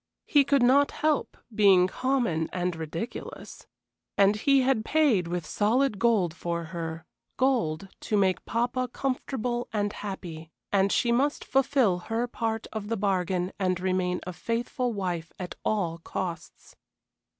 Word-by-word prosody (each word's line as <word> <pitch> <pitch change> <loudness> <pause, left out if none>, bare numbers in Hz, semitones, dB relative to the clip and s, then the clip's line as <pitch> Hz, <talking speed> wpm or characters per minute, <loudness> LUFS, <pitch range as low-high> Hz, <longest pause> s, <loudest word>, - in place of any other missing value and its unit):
He 290 -2 +5
could 280 -2 +3
not 275 +3 +5
help 305 -1 -1 0.2
being 195 -4 +6
common 230 -7 0
and 180 -1 -1
ridiculous. 165 +8 -7 0.5
And 200 +1 +5
he 275 +5 +3
had 255 -4 +2
paid 260 - +2
with 175 -1 -3
solid 215 - +1
gold 210 -8 +2
for 170 0 -3
her, 165 -1 -6 0.3
gold 200 -10 +1
to 210 - -1
make 190 -2 +2
papa 245 +2 0
comfortable 250 -2 -2
and 205 -1 -1
happy, 170 -6 -7 0.2
and 195 0 +3
she 240 - +2
must 275 +5 +1
fulfil 265 -9 +2
her 225 +6 -2
part 225 -2 -3
of 215 -2 -4
the 230 +1 -1
bargain 185 -2 0
and 185 -2 +1
remain 185 -1 0
a 180 - -5
faithful 240 +4 -2
wife 180 -6 -3
at 180 -1 -5
all 175 -6 -1
costs. 170 0 -6
205 Hz, 140 wpm, -27 LUFS, 180-245 Hz, 0.5 s, being